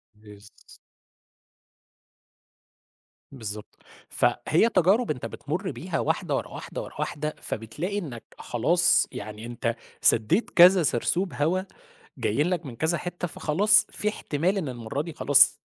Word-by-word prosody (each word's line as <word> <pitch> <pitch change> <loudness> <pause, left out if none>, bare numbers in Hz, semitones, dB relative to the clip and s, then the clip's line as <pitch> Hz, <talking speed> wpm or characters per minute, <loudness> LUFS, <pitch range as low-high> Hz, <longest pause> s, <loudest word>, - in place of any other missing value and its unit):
بالض 105 0 -17 2.5
بالضبط. 110 -5 -8 0.3
فهي 175 +9 +2
تجارب 195 +6 +3
أنت 125 -6 -5
بتمُر 160 - -4
بيها 180 -1 -4
واحدة، - - -1
ورا - - -2
واحدة، - - -7
ورا - - -10
واحدة، 150 +1 -3
فبتلاقي 150 - -4
إنك 130 - -7 0.2
خلاص 170 +9 +2
يعني 110 -3 -7
أنت 120 -1 -3 0.3
سدّيت 160 - +3
كذا 180 +1 +7
سرسوب 175 +8 0
هوا 165 +6 +1 0.6
جايين 150 - 0
لك 175 -3 -2
من 125 -4 -8
كذا 160 +6 0
حِتّة، 175 +1 -5
فخلاص 200 +7 +3
في 210 - -2
احتمال 180 -1 -1
إن 165 -8 -2
المرّة 120 +2 -4
دي 165 +1 -7
خلاص 140 -1 +5
155 Hz, 125 wpm, -26 LUFS, 120-180 Hz, 2.5 s, كذا